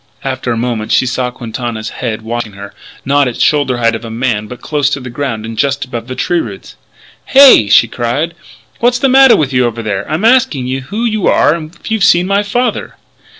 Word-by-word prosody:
After 130 Hz, -2 st, -3 dB
a 115 Hz, -, -1 dB
moment 115 Hz, -2 st, -3 dB
she -, -, +3 dB
saw 125 Hz, 0 st, -2 dB
Quintana's 115 Hz, -2 st, -6 dB
head 110 Hz, -3 st, -5 dB
watching 115 Hz, -2 st, -4 dB
her, 100 Hz, +1 st, -10 dB, 0.3 s
not 140 Hz, 0 st, +2 dB
at 120 Hz, -, -4 dB
the -, -, -10 dB
shoulder 140 Hz, -4 st, +1 dB
height 115 Hz, -1 st, +1 dB
of 115 Hz, -, -5 dB
a 115 Hz, -, -7 dB
man 115 Hz, -2 st, -2 dB
but 125 Hz, +2 st, -10 dB
close 145 Hz, -2 st, -1 dB
to 145 Hz, -, -2 dB
the 125 Hz, -1 st, -8 dB
ground 120 Hz, -4 st, -4 dB
and 115 Hz, 0 st, -7 dB
just 140 Hz, +3 st, -1 dB
above 120 Hz, -2 st, -7 dB
the 130 Hz, -, -6 dB
tree 175 Hz, +5 st, 0 dB
roots. -, -, -8 dB, 0.5 s
"Hey!" 270 Hz, -, +7 dB
she 115 Hz, -, +5 dB
cried. 125 Hz, +9 st, -2 dB, 0.5 s
"What's 245 Hz, +1 st, +2 dB
the 270 Hz, +2 st, +1 dB
matter 265 Hz, -1 st, +6 dB
with 140 Hz, -3 st, -1 dB
you 125 Hz, -1 st, +2 dB
over 115 Hz, 0 st, -5 dB
there? 100 Hz, 0 st, -3 dB
I'm 160 Hz, +8 st, -1 dB
asking 235 Hz, -, +2 dB
you 130 Hz, +1 st, -3 dB
who 210 Hz, -, -4 dB
you 215 Hz, -3 st, 0 dB
are -, -, +3 dB
and 165 Hz, 0 st, -7 dB
if -, -, -10 dB
you've 220 Hz, -3 st, 0 dB
seen 175 Hz, -2 st, +4 dB
my 200 Hz, +2 st, +1 dB
father?" 240 Hz, +5 st, -2 dB
130 Hz, 225 wpm, -13 LUFS, 115-170 Hz, 0.5 s, Hey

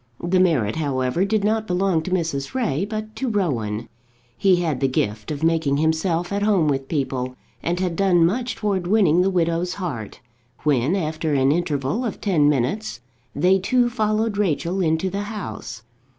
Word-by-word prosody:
The 180 Hz, +2 st, +2 dB
merit, 150 Hz, -, +2 dB
however, 140 Hz, +3 st, 0 dB
did 210 Hz, 0 st, 0 dB
not 220 Hz, +1 st, +1 dB
belong 180 Hz, -2 st, +1 dB
to 160 Hz, -, -5 dB
Mrs. 165 Hz, -, -2 dB
Ray, 195 Hz, -, 0 dB
but 215 Hz, +1 st, -5 dB
to 265 Hz, -, -1 dB
Rowan. 120 Hz, -, -1 dB, 0.5 s
He 185 Hz, +10 st, +4 dB
had 165 Hz, -7 st, -1 dB
the 135 Hz, -, +2 dB
gift 105 Hz, -4 st, -2 dB
of 150 Hz, 0 st, -4 dB
making 160 Hz, -4 st, +2 dB
himself 165 Hz, +3 st, 0 dB
at 200 Hz, -, -1 dB
home 200 Hz, -6 st, +3 dB
with 135 Hz, -2 st, -1 dB
people, 130 Hz, -4 st, -2 dB, 0.3 s
and 175 Hz, +1 st, -1 dB
had 180 Hz, -2 st, -1 dB
done 180 Hz, -3 st, +4 dB
much 235 Hz, +6 st, -1 dB
towards 195 Hz, -5 st, -1 dB
winning 185 Hz, -6 st, +4 dB
the 190 Hz, -, +2 dB
widow's 175 Hz, -1 st, 0 dB
heart, 140 Hz, -, -5 dB, 0.4 s
when, 145 Hz, +2 st, +2 dB
after 155 Hz, -4 st, -1 dB
an 135 Hz, 0 st, +3 dB
interval 150 Hz, -, -1 dB
of 230 Hz, -, -4 dB
ten 160 Hz, -8 st, +3 dB
minutes, 145 Hz, -, -1 dB, 0.3 s
they 185 Hz, +6 st, +3 dB
two 245 Hz, +5 st, +2 dB
followed 215 Hz, -2 st, 0 dB
Rachel 185 Hz, 0 st, 0 dB
into 160 Hz, +2 st, +1 dB
the 200 Hz, +2 st, -2 dB
house. 115 Hz, -, -6 dB
170 Hz, 170 wpm, -22 LUFS, 145-200 Hz, 0.5 s, He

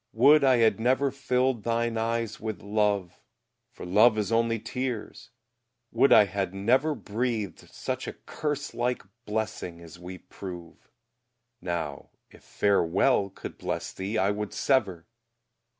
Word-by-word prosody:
Would 140 Hz, +6 st, +6 dB
I 130 Hz, -2 st, +5 dB
had 110 Hz, -3 st, +3 dB
never 130 Hz, +4 st, +2 dB
filled 130 Hz, -2 st, 0 dB
thine 115 Hz, +1 st, 0 dB
eyes 115 Hz, 0 st, -2 dB
with 110 Hz, -1 st, -5 dB
love, 100 Hz, -3 st, 0 dB, 0.5 s
For 125 Hz, -, -10 dB
love 110 Hz, +5 st, +5 dB
is 105 Hz, 0 st, -1 dB
only 115 Hz, 0 st, +2 dB
tears: 125 Hz, -1 st, -5 dB, 0.6 s
would 125 Hz, +4 st, +3 dB
I 105 Hz, -, +8 dB
had 95 Hz, -1 st, -3 dB
never 130 Hz, +10 st, +2 dB
Breathed 110 Hz, -3 st, -3 dB
such -, -, -4 dB
a -, -, -4 dB
curse 145 Hz, -1 st, -4 dB
like 125 Hz, +1 st, -1 dB, 0.2 s
blessing 105 Hz, -5 st, -3 dB
as 85 Hz, 0 st, -13 dB
we 90 Hz, +1 st, -8 dB
prove; 90 Hz, -3 st, -10 dB, 0.7 s
Now, 80 Hz, -6 st, -4 dB, 0.2 s
if -, -, -17 dB
"Farewell" 100 Hz, +2 st, +2 dB
could 95 Hz, -, -9 dB
bless -, -, -4 dB
thee, 100 Hz, +4 st, -3 dB
I 100 Hz, -1 st, +2 dB
would 105 Hz, 0 st, -4 dB
sever! 100 Hz, -11 st, +1 dB
110 Hz, 135 wpm, -27 LUFS, 95-125 Hz, 0.7 s, I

